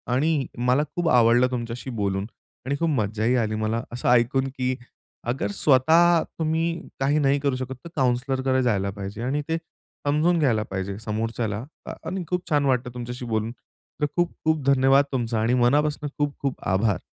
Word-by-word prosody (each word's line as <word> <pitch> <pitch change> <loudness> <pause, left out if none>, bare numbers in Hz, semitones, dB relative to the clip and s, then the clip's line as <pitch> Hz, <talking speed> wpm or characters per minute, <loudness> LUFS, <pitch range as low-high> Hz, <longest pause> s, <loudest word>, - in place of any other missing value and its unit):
आणि 150 0 +1
मला 125 +4 +2
खूप 175 -2 +1
आवडलं 120 0 +5
तुमच्याशी 120 +1 -4
बोलून 100 -4 -1 0.4
आणि 140 +2 0
खूप 165 - +1
मज्जाही 110 -2 +1
आली 110 0 -2
मला. 110 +2 -1
असं 120 +1 -1
ऐकून 125 +2 +3
की 130 0 0 0.5
अगर 120 -4 -1
स्वतः 160 +8 +4 0.2
तुम्ही 165 +1 0 0.2
काही 140 +3 +2
नाही 140 -1 +3
करू 140 -2 0
शकत. 130 0 -4
तर - - -7
काउंसलरकडे 130 0 +1
जायला 100 -5 +1
पाहिजे.आणि 105 +8 -3
ते 165 - +1 0.5
समजून 160 +4 +3
घ्यायला 120 -8 +2
पाहिजे 95 -1 -4
समोरच्याला 110 0 -2 0.2
अ, - - -5
आणि 185 -1 -3
खूप 180 0 -2
छान 145 -3 +2
वाटतं 125 -2 0
तुमच्याशी 125 0 -6
बोलून. 110 -1 -1 0.5
तर - - +4
खूप-खूप 160 -3 0
धन्यवाद 135 +1 +5
तुमचा 120 -4 -1
आणि 115 +3 +2
मनापासून 145 +4 +2
खूप-खूप 140 -2 -2
आभार. 95 0 +2
130 Hz, 160 wpm, -24 LUFS, 115-145 Hz, 0.5 s, आवडलं